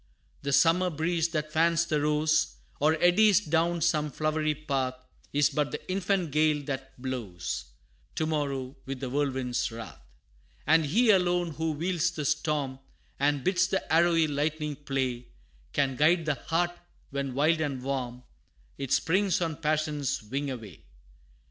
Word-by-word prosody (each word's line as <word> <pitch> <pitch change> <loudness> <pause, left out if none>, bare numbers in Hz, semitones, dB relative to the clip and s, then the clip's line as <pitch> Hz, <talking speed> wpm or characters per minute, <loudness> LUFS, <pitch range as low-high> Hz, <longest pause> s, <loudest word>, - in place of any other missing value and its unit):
The 140 - -2
summer 170 +5 +4
breeze 165 +1 0
that 155 -2 -3
fans 165 +1 +3
the 155 -3 0
rose, 150 - +2 0.2
Or 155 +2 +3
eddies 195 +3 +5
down 170 -2 0
some 155 -2 +2
flowery 155 +1 0
path, 135 -4 -2 0.4
Is 145 -1 +3
but 150 -2 0
the 150 - -6
infant 185 -3 0
gale 150 0 +2
that 135 -2 -6
blows 115 -10 -4 0.5
To 160 - 0
morrow 140 -4 -2
with 135 -1 -4
the 130 -1 -4
whirlwind's 130 -4 -1
wrath. 115 0 -9 0.6
And 160 -1 +4
He 220 +9 +4
alone, 175 -3 +2
who 160 +1 -2
wields 170 +2 0
the 150 -3 -5
storm, 140 -2 -1 0.4
And 145 -1 +1
bids 185 -1 +2
the 190 -3 -2
arrowy 165 0 +4
lightning 150 0 -1
play, 130 -4 -3 0.4
Can 135 -2 0
guide 165 +3 +4
the 150 - +2
heart, 170 +4 -1 0.4
when 140 -2 -3
wild 155 +3 +3
and 140 -5 -2
warm, 125 -2 -3 0.6
It 135 -2 -4
springs 180 +7 +2
on 165 -4 -2
passion's 150 -4 -1
wing 140 +6 -3
away! 115 -9 -8
150 Hz, 150 wpm, -28 LUFS, 135-165 Hz, 0.6 s, eddies